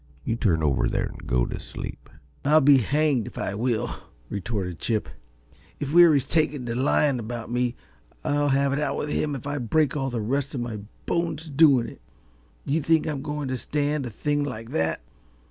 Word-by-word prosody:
You 115 Hz, -, 0 dB
turn 85 Hz, -9 st, +1 dB
over 70 Hz, -3 st, +2 dB
there -, -, -1 dB
an' -, -, -11 dB
go -, -, +2 dB
t' -, -, -5 dB
sleep." -, -, -8 dB, 0.3 s
"I'll 150 Hz, +2 st, +5 dB
be 140 Hz, -2 st, +6 dB
hanged 140 Hz, -1 st, +1 dB
if -, -, -10 dB
I -, -, -2 dB
will!" 115 Hz, +1 st, -1 dB, 0.3 s
retorted 95 Hz, -4 st, -3 dB
Chip. 110 Hz, -3 st, -1 dB, 0.7 s
"If 145 Hz, 0 st, -3 dB
Weary's 165 Hz, -6 st, +7 dB
taken 150 Hz, -4 st, +1 dB
to 115 Hz, -, -2 dB
lying 135 Hz, +1 st, +2 dB
about 120 Hz, +1 st, -5 dB
me 125 Hz, 0 st, 0 dB, 0.5 s
I'll 145 Hz, 0 st, +1 dB
have 140 Hz, 0 st, +2 dB
it 140 Hz, -, 0 dB
out 145 Hz, -2 st, -1 dB
with 150 Hz, -, -2 dB
him 150 Hz, -1 st, 0 dB
if 135 Hz, -, -7 dB
I 145 Hz, 0 st, -2 dB
break 140 Hz, +5 st, +1 dB
all 135 Hz, -2 st, -1 dB
the 120 Hz, -2 st, -2 dB
rest 135 Hz, +6 st, -1 dB
of 125 Hz, -, -2 dB
my 115 Hz, -3 st, -4 dB, 0.3 s
bones 165 Hz, -2 st, -1 dB
doing 140 Hz, -4 st, +5 dB
it. -, -, -11 dB, 0.6 s
Do -, -, -1 dB
you 160 Hz, -, +2 dB
think 160 Hz, +2 st, +3 dB
I'm 150 Hz, -4 st, -2 dB
going 150 Hz, 0 st, -3 dB
to 130 Hz, -, -1 dB
stand 145 Hz, +1 st, -1 dB
a -, -, -4 dB
thing 145 Hz, +6 st, -1 dB
like 115 Hz, -4 st, -6 dB
that? 80 Hz, 0 st, 0 dB
135 Hz, 195 wpm, -25 LUFS, 115-150 Hz, 0.7 s, Weary's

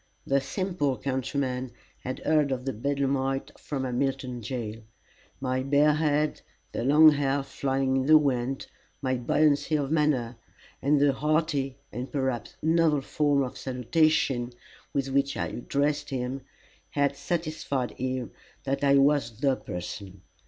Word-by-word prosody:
The 140 Hz, 0 st, +2 dB
simple 145 Hz, -2 st, -1 dB
countryman 130 Hz, -1 st, -2 dB, 0.3 s
had 130 Hz, -, -5 dB
heard 150 Hz, -3 st, +3 dB
of 130 Hz, -1 st, -2 dB
the 135 Hz, -, -1 dB
bedlamite 135 Hz, +2 st, -1 dB
from 140 Hz, -3 st, -4 dB
Hamilton 125 Hz, -1 st, -2 dB
jail. 115 Hz, -2 st, -5 dB, 0.6 s
My 130 Hz, -1 st, -1 dB
bare 145 Hz, +3 st, +4 dB
head, 150 Hz, 0 st, +1 dB, 0.3 s
the -, -, -3 dB
long 150 Hz, +4 st, +7 dB
hair 140 Hz, -1 st, 0 dB
flying 135 Hz, -1 st, 0 dB
in 130 Hz, -, 0 dB
the 155 Hz, 0 st, +9 dB
wind, 135 Hz, -3 st, 0 dB, 0.4 s
my 130 Hz, -1 st, +1 dB
buoyancy 145 Hz, +5 st, +2 dB
of 145 Hz, -1 st, -1 dB
manner, 140 Hz, -7 st, +1 dB, 0.4 s
and 145 Hz, +2 st, +3 dB
the 140 Hz, -1 st, +4 dB
hearty, 150 Hz, -2 st, 0 dB
and, 125 Hz, +3 st, -5 dB
perhaps, 130 Hz, -5 st, -2 dB
novel 160 Hz, -2 st, +3 dB
form 145 Hz, 0 st, +1 dB
of 125 Hz, -, -6 dB
salutation 130 Hz, -1 st, +1 dB, 0.4 s
with 135 Hz, -1 st, -1 dB
which 140 Hz, +1 st, +1 dB
I -, -, -1 dB
addressed 145 Hz, +3 st, -1 dB
him, 130 Hz, 0 st, -3 dB, 0.5 s
had 140 Hz, -1 st, +1 dB
satisfied 155 Hz, -6 st, -2 dB
him 130 Hz, -1 st, -3 dB, 0.3 s
that 135 Hz, +1 st, -2 dB
I 140 Hz, 0 st, +5 dB
was 135 Hz, -5 st, +3 dB
the 135 Hz, -1 st, +2 dB
person. 95 Hz, -1 st, -7 dB
135 Hz, 140 wpm, -27 LUFS, 130-145 Hz, 0.6 s, the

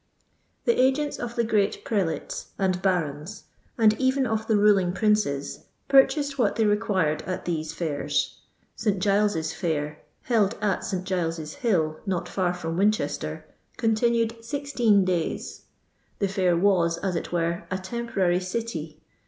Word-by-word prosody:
The 470 Hz, -, +3 dB
agents 275 Hz, +3 st, +1 dB
of 240 Hz, -1 st, -5 dB
the 235 Hz, -, +2 dB
great 210 Hz, -3 st, 0 dB
prelates 180 Hz, -9 st, -2 dB
and 185 Hz, -2 st, 0 dB
barons, 175 Hz, -1 st, -1 dB, 0.3 s
nnd 215 Hz, -2 st, +4 dB
even 260 Hz, 0 st, +2 dB
of 220 Hz, -1 st, -2 dB
the 220 Hz, -, +3 dB
ruling 200 Hz, -4 st, +4 dB
princes, 195 Hz, -10 st, 0 dB, 0.2 s
purchased 275 Hz, +1 st, +4 dB
what -, -, +2 dB
they 225 Hz, -, +2 dB
required 205 Hz, -7 st, +1 dB
at 185 Hz, -, -4 dB
these 160 Hz, -3 st, -2 dB
iairs. 155 Hz, -5 st, -1 dB, 0.4 s
St. 210 Hz, -3 st, 0 dB
Qiles's 200 Hz, -5 st, +1 dB
fair, 150 Hz, -4 st, -2 dB, 0.2 s
held 225 Hz, -3 st, +2 dB
at 205 Hz, -2 st, 0 dB
St. 185 Hz, -2 st, -3 dB
Giles's 165 Hz, -4 st, -2 dB
hill, 160 Hz, -10 st, 0 dB
not 180 Hz, -3 st, -1 dB
far 180 Hz, -2 st, -1 dB
from 165 Hz, -1 st, -4 dB
Winchester, 210 Hz, +3 st, 0 dB, 0.3 s
con 225 Hz, -1 st, +2 dB
tinned 230 Hz, 0 st, +1 dB
sixteen 235 Hz, -6 st, +2 dB
days. 180 Hz, -3 st, -2 dB, 0.5 s
The 200 Hz, -, +1 dB
fair 185 Hz, -3 st, +1 dB
was, 170 Hz, -3 st, +3 dB
as 185 Hz, -1 st, -2 dB
it 165 Hz, -, -4 dB
were, 170 Hz, 0 st, -1 dB
a 185 Hz, -, -1 dB
temporary 190 Hz, -3 st, -1 dB
city. 180 Hz, -6 st, -5 dB
195 Hz, 145 wpm, -25 LUFS, 170-225 Hz, 0.5 s, nnd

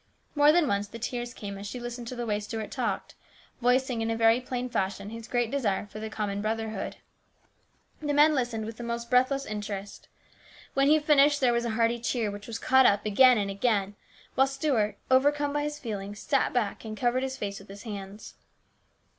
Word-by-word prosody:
More 290 Hz, 0 st, +6 dB
than 335 Hz, -1 st, +3 dB
once 200 Hz, -1 st, 0 dB
the 230 Hz, -, -9 dB
tears 240 Hz, +1 st, -4 dB
came 200 Hz, -4 st, -7 dB
as 200 Hz, -, -6 dB
she 250 Hz, -, -6 dB
listened 240 Hz, 0 st, -6 dB
to 255 Hz, -, -5 dB
the 240 Hz, -1 st, -3 dB
way 210 Hz, -2 st, 0 dB
Stuart 215 Hz, +1 st, -5 dB
talked, 230 Hz, -7 st, -2 dB, 0.5 s
voicing 250 Hz, -1 st, +2 dB
in 225 Hz, -, -1 dB
a 225 Hz, -, 0 dB
very 225 Hz, +2 st, +4 dB
plain 250 Hz, 0 st, -3 dB
fashion 200 Hz, -3 st, -2 dB
his 230 Hz, 0 st, -8 dB
great 240 Hz, -2 st, 0 dB
desire 225 Hz, -9 st, 0 dB
for 210 Hz, +1 st, -10 dB
the 220 Hz, 0 st, -5 dB
common 205 Hz, -2 st, -3 dB
brother 220 Hz, +1 st, -2 dB
hood. 215 Hz, -3 st, -5 dB, 1.1 s
The 295 Hz, -1 st, -1 dB
men 300 Hz, +1 st, +6 dB
listened 240 Hz, -5 st, -1 dB
with 225 Hz, 0 st, -7 dB
the 240 Hz, -, -7 dB
most 235 Hz, 0 st, -4 dB
breathless 260 Hz, +2 st, +3 dB
interest. 205 Hz, -1 st, -6 dB, 0.7 s
When 275 Hz, 0 st, +3 dB
he 305 Hz, +2 st, +6 dB
finished 295 Hz, -1 st, +4 dB
there 250 Hz, -3 st, +3 dB
was 235 Hz, 0 st, 0 dB
a -, -, -1 dB
hearty 235 Hz, +1 st, +2 dB
cheer, 230 Hz, -2 st, -1 dB
which 205 Hz, 0 st, -9 dB
was 230 Hz, -1 st, -4 dB
caught 260 Hz, +2 st, +5 dB
up 205 Hz, +1 st, +2 dB
again 250 Hz, +4 st, +6 dB
and 200 Hz, -1 st, -1 dB
again, 200 Hz, -1 st, 0 dB, 0.4 s
while 270 Hz, +1 st, +4 dB
Stuart, 270 Hz, -6 st, 0 dB
overcome 290 Hz, +2 st, +3 dB
by 295 Hz, -, 0 dB
his 295 Hz, 0 st, -3 dB
feelings, 205 Hz, -5 st, -5 dB
sat 275 Hz, +5 st, +1 dB
back 225 Hz, -5 st, -1 dB
and 215 Hz, -1 st, -6 dB
covered 245 Hz, +1 st, +1 dB
his 265 Hz, 0 st, -3 dB
face 200 Hz, -4 st, -4 dB
with 195 Hz, -, -15 dB
his 200 Hz, +1 st, -11 dB
hands. 205 Hz, -2 st, -8 dB
235 Hz, 205 wpm, -28 LUFS, 210-260 Hz, 1.1 s, More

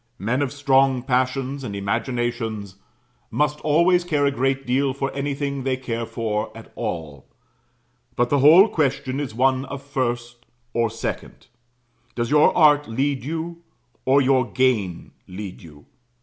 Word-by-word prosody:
Men 120 Hz, +7 st, -1 dB
of 140 Hz, -3 st, -1 dB
strong 135 Hz, -2 st, +2 dB
passions 130 Hz, +1 st, -1 dB
and 105 Hz, -5 st, -5 dB
imaginations 110 Hz, -1 st, -3 dB, 0.5 s
must 150 Hz, 0 st, 0 dB
always 170 Hz, +4 st, +3 dB
care 150 Hz, -5 st, +1 dB
a 140 Hz, -, +3 dB
great 135 Hz, 0 st, -1 dB
deal 130 Hz, +1 st, +1 dB
for 135 Hz, -1 st, -3 dB
anything 140 Hz, 0 st, -3 dB
they 130 Hz, 0 st, -1 dB
care 115 Hz, -3 st, -4 dB
for 110 Hz, -2 st, -2 dB
at -, -, -13 dB
all; 75 Hz, -5 st, -5 dB, 0.9 s
but 120 Hz, 0 st, +1 dB
the 145 Hz, -, +3 dB
whole 165 Hz, +9 st, +8 dB
question 135 Hz, -, -1 dB
is 135 Hz, -6 st, -4 dB
one 130 Hz, +1 st, +2 dB
of 140 Hz, +1 st, -7 dB
first 120 Hz, -3 st, -3 dB, 0.3 s
or 115 Hz, -1 st, +1 dB
second. 115 Hz, -, -6 dB, 0.7 s
Does 120 Hz, +2 st, -2 dB
your 150 Hz, 0 st, +5 dB
art 150 Hz, -3 st, +5 dB
lead 135 Hz, +3 st, -1 dB
you, 165 Hz, +3 st, -5 dB, 0.4 s
or 135 Hz, +2 st, +4 dB
your 130 Hz, -2 st, +2 dB
gain 115 Hz, -9 st, 0 dB, 0.2 s
lead 95 Hz, 0 st, -8 dB
you? 75 Hz, -3 st, -15 dB
130 Hz, 145 wpm, -22 LUFS, 120-140 Hz, 0.9 s, whole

